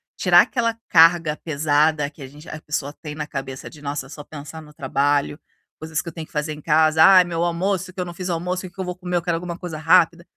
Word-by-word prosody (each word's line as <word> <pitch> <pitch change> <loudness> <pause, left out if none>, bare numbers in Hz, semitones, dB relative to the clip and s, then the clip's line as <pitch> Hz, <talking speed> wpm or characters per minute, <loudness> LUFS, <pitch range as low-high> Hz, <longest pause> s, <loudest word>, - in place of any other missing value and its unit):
tirar - - +6
aquela 230 -3 -1
carga 165 -2 +5
pesada 150 -1 +1
que 150 - -17
a 135 - -7
gente 150 +4 -15
a 155 - -8
pessoa 145 -1 -4
tem 150 -1 -9
na 150 -1 -4
cabeça 135 -2 -7
de 150 - -14
nossa, 140 -1 -4
só 145 +1 -10
pensar 155 +2 -10
no 150 -1 -15
trabalho, 145 +2 0 0.4
coisas 160 0 -3
que 170 - -4
eu - - -13
tenho 160 -2 -7
que - - -27
fazer 150 +1 -2
em 150 - -11
casa, 155 0 +4
"Ai, 185 -2 +8
meu 170 -1 -2
almoço, 185 +2 -1
o - - -13
que 185 - -10
eu 180 - -1
não 175 - -8
fiz 185 +1 -6
almoço, 180 +2 -2
o - - -12
que 175 - -31
que 190 - -4
vou 180 0 -5
comer, 180 -1 -3
eu - - 0
quero 170 -1 0
alguma 170 0 -5
coisa 170 -4 -7
rápida". 165 +2 +3
160 Hz, 260 wpm, -22 LUFS, 150-175 Hz, 0.4 s, Ai